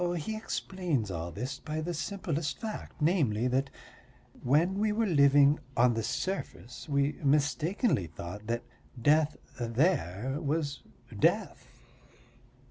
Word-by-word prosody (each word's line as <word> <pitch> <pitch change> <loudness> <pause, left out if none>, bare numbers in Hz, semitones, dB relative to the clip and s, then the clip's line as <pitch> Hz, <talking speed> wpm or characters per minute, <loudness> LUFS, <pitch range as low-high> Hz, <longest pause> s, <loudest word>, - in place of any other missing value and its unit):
"He 215 +7 -3
explains 180 - -2
all 85 0 -4
this 130 +8 -5
by 155 0 -4
the 170 +3 -3
simplest 165 -3 -3
fact, 220 -7 -6
namely, 130 - +2
that 135 +2 +1 0.7
when 165 +9 +2
we 215 0 +2
were 225 +2 +1
living 145 -3 +5 0.2
on 120 0 +5
the 115 - -1
surface 125 - -4
we 140 0 +2
mistakenly 145 - +2
thought 85 +6 -8
that 120 +1 -1 0.4
death 150 +4 +3 0.2
there 120 - 0
was 145 -1 -1 0.4
death. - - +1
145 Hz, 120 wpm, -30 LUFS, 120-170 Hz, 0.7 s, living